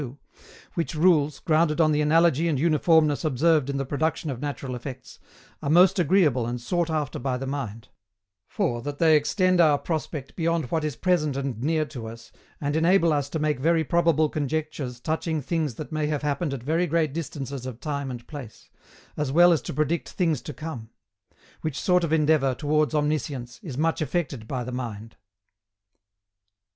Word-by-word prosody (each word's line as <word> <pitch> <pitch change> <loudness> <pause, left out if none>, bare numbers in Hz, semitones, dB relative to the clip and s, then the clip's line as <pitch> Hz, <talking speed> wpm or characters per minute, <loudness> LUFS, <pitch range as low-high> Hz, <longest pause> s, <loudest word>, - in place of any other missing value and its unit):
62, 135 0 -7 0.6
which 165 -1 -2
rules, 155 -3 +3
grounded 155 0 +2
on 155 -2 +4
the 150 0 +2
analogy 165 +1 +3
and 150 -5 0
uniformness 155 -1 +3
observed 155 0 +2
in 140 - -1
the 135 - -2
production 155 +2 -1
of 125 - -6
natural 140 -3 -4
effects, 130 +1 -8 0.4
are 140 - -2
most 185 +4 +5
agreeable 150 -8 +3
and 120 +1 -3
sought 170 +7 -1
after 155 -3 -2
by 125 0 -1
the 135 - -5
mind; 125 -6 -5 0.6
for 120 0 -1
that 145 +3 -5
they 160 -1 +5
extend 185 +4 +3
our 150 -3 +5
prospect 155 -3 -4
beyond 165 -2 0
what 160 -2 0
is 150 -4 -2
present 155 -4 +1
and 135 -5 -3
near 155 +2 +1
to 120 -7 -8
us, 115 +1 -11 0.3
and 145 0 -2
enable 170 0 +4
us 145 -1 -1
to 160 - -3
make 150 -3 0
very 165 +3 +2
probable 165 0 +2
conjectures 150 -4 -3
touching 160 +3 -2
things 150 -2 -2
that 155 - -7
may 155 -1 -1
have 150 -1 -2
happened 150 +1 -1
at 135 -4 -5
very 165 +6 +1
great 160 -3 +1
distances 140 -4 -5
of 125 -2 -7
time 140 -1 -3
and 120 -2 -7
place, 140 -8 -10 0.4
as 150 -3 -2
well 175 +4 +6
as 155 - 0
to - - -6
predict 155 +2 -1
things 165 -7 0
to - - -7
come; 140 -8 -7 0.7
which 155 -4 -3
sort 180 -1 +2
of 165 - -1
endeavour 150 -4 +3
towards 150 +2 +1
omniscience 145 -5 -2
is 140 -8 -7
much 160 +2 0
affected 140 -6 -2
by 125 -1 -3
the 125 - -6
mind. 115 -3 -6
150 Hz, 180 wpm, -25 LUFS, 135-160 Hz, 0.7 s, well